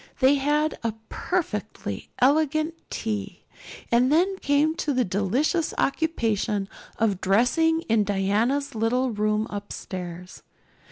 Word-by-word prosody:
They 265 +1 +5
had 295 +2 +1
a 225 -2 -1
"perfectly 215 - -3
elegant 310 +4 +2 0.2
tea;" 205 -4 -4 0.5
and 245 +3 +4
then 365 +5 +3
came 285 +2 +2
the 275 -6 0
delicious 230 - 0
occupation 220 -10 0 0.3
of 205 -4 +1
dressing 285 - +3
in 225 -7 +2
Diana's 210 +8 0
little 240 +3 +1
room 215 0 0
upstairs. 180 -3 -7
235 Hz, 105 wpm, -25 LUFS, 205-300 Hz, 0.5 s, They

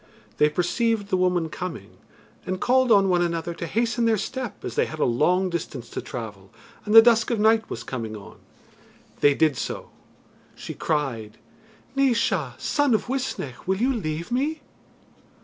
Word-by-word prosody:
They 150 - +5
perceived 205 +6 0
the - - +2
woman 180 -3 +1
coming, 165 - -7 0.5
and 185 0 -2
called 255 +1 +3
on 200 -2 +6
one 180 -2 +2
another 170 0 -1
to 170 0 -6
hasten 230 +4 0
their 225 -1 +3
step 240 +1 -5
as - - -4
they - - +1
had 155 - -7
a - - +1
long 180 +10 +2
distance 140 -7 -5
to - - -4
travel, 105 -5 -8 0.4
and 210 +1 +1
the 225 - +12
dusk 230 -1 +4
of 235 -3 0
night 220 +1 +3
was - - -5
coming 115 -4 -5
on. 100 - -13 0.8
They 145 -1 +4
did 155 -2 +3
so. - - -5 0.6
She - - -7
cried: 120 -8 -2 0.6
"Naois, 230 - +1
son 290 -5 +1
of 215 - -3
Uisnech, 250 - -4
will 190 0 +1
you 255 +6 +1
leave 165 -4 -4
me?" 295 +5 -1
185 Hz, 165 wpm, -24 LUFS, 150-230 Hz, 0.8 s, the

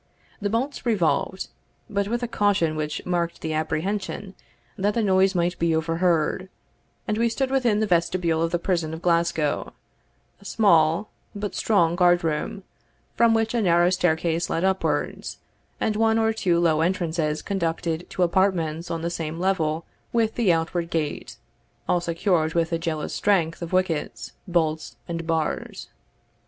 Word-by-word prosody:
The 205 - 0
bolts 250 +7 -2
revolved, 190 - 0 0.4
but 200 -1 -1
with 240 +3 -2
a - - 0
caution 200 -8 +1
which 150 -1 -3
marked 170 -1 -1
the 160 - -2
apprehension 190 +5 -2 0.4
that 205 +2 0
the 230 - +1
noise 190 -1 +3
might 175 +1 0
be 165 -1 +2
overheard, 165 +2 0 0.6
and 215 +1 -1
we 235 0 +3
stood 260 +3 -1
within 240 -6 +2
the - - +3
vestibule 170 -3 +1
of 165 - +1
the 175 - 0
prison 170 -3 -1
of 160 - -11
Glasgow, 170 -3 +1 0.7
a - - -17
small, 170 -2 +3 0.2
but 205 0 -4
strong 175 -6 +2
guard 175 -1 +4
room, 160 +4 -2 0.5
from 230 -1 +4
which 225 0 0
a 235 - +1
narrow 175 -2 +4
staircase 170 -2 +1
led 165 - -1
upwards, 190 0 -1 0.4
and 215 - 0
one 225 +1 +3
or 225 0 +2
two 180 -6 +1
low 160 -2 +3
entrances 165 -3 0
conducted 170 -3 -2
to 185 - 0
apartments 170 -3 +1
on 165 -1 -3
the 170 - -1
same 165 -1 -4
level 165 -4 0 0.3
with 225 -2 +1
the 225 -7 +2
outward 170 +1 -1
gate, 155 -3 -3 0.5
all 175 - +2
secured 170 -1 0
with 165 0 +1
the 165 - 0
jealous 160 -2 -3
strength 175 -6 +1
of 170 - -5
wickets, 185 -4 -1 0.2
bolts, 160 -3 0
and 165 -1 -4
bars. 160 -2 -2
175 Hz, 155 wpm, -24 LUFS, 165-200 Hz, 0.7 s, guard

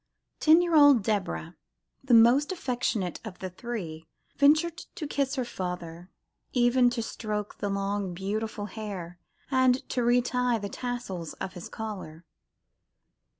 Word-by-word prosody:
Ten 325 +3 +6
year 345 -1 -1
old 285 -7 +7
Deborah, 190 - -2 0.5
the 260 -3 +4
most 245 +8 +6
affectionate 245 - -2
of 215 -5 -8
the 185 -1 -6
three, 175 -7 -6 0.3
ventured 310 +4 +4 0.2
to 310 - -4
kiss 280 -1 -1
her 255 -3 -1
father, 180 -4 -6 0.4
even 245 0 +4
to 240 -1 -3
stroke 210 -2 -4
his 205 - -1
long, 195 -2 -2
beautiful 205 +3 -3
hair, 190 -5 -7 0.3
and 260 -1 +3
to 250 - 0
re 240 +1 +4
tie 250 -1 +1
the 200 -2 -5
tassels 235 -9 -5
of 190 - -6
his 175 - -8
collar. 185 -7 -7
220 Hz, 140 wpm, -28 LUFS, 190-250 Hz, 0.5 s, old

